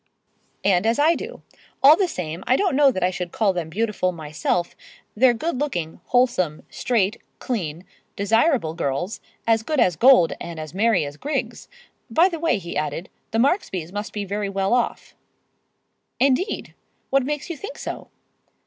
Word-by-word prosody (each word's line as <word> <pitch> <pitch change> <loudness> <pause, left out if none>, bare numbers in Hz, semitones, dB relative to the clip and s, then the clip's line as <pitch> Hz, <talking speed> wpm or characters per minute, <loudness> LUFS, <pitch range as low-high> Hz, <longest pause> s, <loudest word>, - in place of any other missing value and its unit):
"And 195 +1 +3
as 230 - +2
I 305 +3 +5
do. 450 +8 -7 0.4
All 290 +3 +9
the 375 +2 +1
same, 170 - -5
I 255 - +4
don't 375 -2 +1
know 285 0 +6
that 185 -8 -2
I 180 - +2
should 180 -1 -5
call 205 -4 +1
them 170 -3 -3
beautiful 210 0 0
myself. 165 +1 -2 0.4
They're 245 +2 +5
good 285 +3 -2
looking, 175 - -3
wholesome, 240 -11 +1
straight, 225 -4 0 0.2
clean, 175 -8 -4 0.3
desirable 225 - +2
girls, 165 +5 -3 0.2
as 225 -1 +3
good 300 +5 -1
as 180 -8 +3
gold 245 -8 +6
and 170 -2 -6
as 155 -1 -7
merry 200 -4 +2
as 145 +1 -8
grigs. 265 - -3 0.4
By 330 +10 +4
the 335 -3 -5
way," 325 -7 +2
he 170 -3 -7
added, 165 +3 -3 0.2
"the 225 - -2
Marksbys 225 - 0
must 205 +2 -4
be 205 -1 -4
very 200 +1 -2
well 195 +2 0
off." 245 -1 -1 1.1
"Indeed! 275 - +1 0.4
What 275 +1 +4
makes 295 +2 -3
you - - -4
think 410 - -8
so?" - - -6
215 Hz, 165 wpm, -23 LUFS, 180-270 Hz, 1.1 s, All